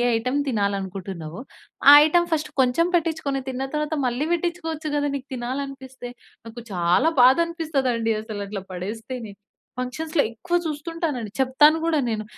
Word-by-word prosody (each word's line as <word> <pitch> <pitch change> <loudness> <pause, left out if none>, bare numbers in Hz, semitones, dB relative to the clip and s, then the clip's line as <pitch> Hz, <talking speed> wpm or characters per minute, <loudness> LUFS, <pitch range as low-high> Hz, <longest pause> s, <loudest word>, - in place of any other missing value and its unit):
Item 250 +5 0
తినాలి 200 -4 0
అనుకుంటున్నావో 185 -2 -7 0.5
ఆ - - +11
item 345 +2 +2
first 305 -1 -2
కొంచెం 260 +7 +2
పెట్టించుకొని 310 -5 -2
తిన్న 265 +1 -3
తరువాత 300 +1 -1
మళ్ళీ 250 +5 -1
పెట్టించుకోవచ్చు 325 -3 -3
గదా! 290 0 0
నీకు 270 0 -6
తినాలనిపిస్తే. 260 0 -6 0.4
నాకు 230 +1 -9
చాలా 180 - +3
బాధనిపిస్తదండి 270 -6 +2
అసలు 215 -2 -6
అట్లా 200 -2 -6
పడేస్తేనే. 220 +4 -6 0.5
ఫంక్షన్స్‌లో 295 +5 -1
ఎక్కువ 345 +10 -3
చూస్తుంటానండి. 300 - -3
చెప్తాను 280 +4 +5
గూడా 320 -3 +2
నేను. 215 -1 -2
265 Hz, 130 wpm, -23 LUFS, 225-310 Hz, 0.5 s, ఆ